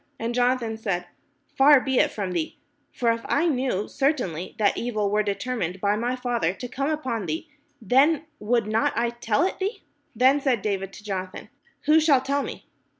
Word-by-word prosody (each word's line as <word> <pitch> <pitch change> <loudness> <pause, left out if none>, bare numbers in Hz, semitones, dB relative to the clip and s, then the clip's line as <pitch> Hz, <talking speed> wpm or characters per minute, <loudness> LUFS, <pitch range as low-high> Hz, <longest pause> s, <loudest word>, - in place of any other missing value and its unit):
And 230 +1 -3
Jonathan 245 -2 +1
said: 195 -5 -2 0.5
"Far 280 +1 +7
be 265 -1 0
it - - +4
from 195 -3 -4
thee: 170 -3 -3 0.3
for 235 -2 +1
if 230 0 -2
I 300 +4 +2
knew 255 - 0
certainly 245 - -1
that 205 -2 +2
evil 215 -4 -1
were 210 0 +3
determined 200 -3 -3
by 205 +2 +1
my 240 +4 -1
father 240 -8 -1
to 245 - -6
come 275 +4 -2
upon 260 - -2
thee, 160 - -3 0.3
then 275 - +3
would 230 +1 +1
not 220 +1 +1
I 235 0 +1
tell 235 +2 0
it 380 - -3
thee? 395 +4 -3 0.2
" 295 - -43
Then 265 +5 +4
said 255 -7 +1
David 195 -2 -2
to 210 - -12
Jonathan: 185 -2 -5 0.3
"Who 305 +2 +5
shall 305 -4 +4
tell 280 +2 0
me? - - -7
235 Hz, 190 wpm, -25 LUFS, 205-270 Hz, 0.5 s, Far